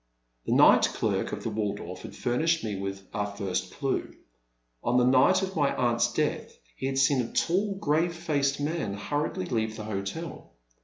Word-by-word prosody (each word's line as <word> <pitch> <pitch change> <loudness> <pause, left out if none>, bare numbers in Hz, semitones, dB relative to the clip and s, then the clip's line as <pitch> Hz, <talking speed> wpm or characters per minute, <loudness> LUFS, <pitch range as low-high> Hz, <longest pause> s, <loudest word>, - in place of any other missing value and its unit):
The - - +2
night - - +6
clerk - - 0
of - - -5
the 115 - -2
Waldorf 100 -4 -3
had - - -9
ftimished 160 +5 0
us 100 -3 -3
with 95 0 -5
our 105 0 -1
first 95 -2 -2
clue. 135 -2 -2 0.7
On 125 - +2
the 125 - +4
night 130 +9 +5
of 190 0 -4
my 145 -3 +2
aunt's 120 -1 +2
death - - -2 0.2
he 130 - -3
had 135 0 -2
seen 135 -1 +4
a 115 - -5
tall, 195 +4 +1
grave 170 -1 +1
faced 145 -5 0
man, 145 -8 -2
hurriedly 145 -1 -2
leave 110 -1 -1
the 110 - -5
hotel. 105 - -5
130 Hz, 175 wpm, -28 LUFS, 105-155 Hz, 0.7 s, night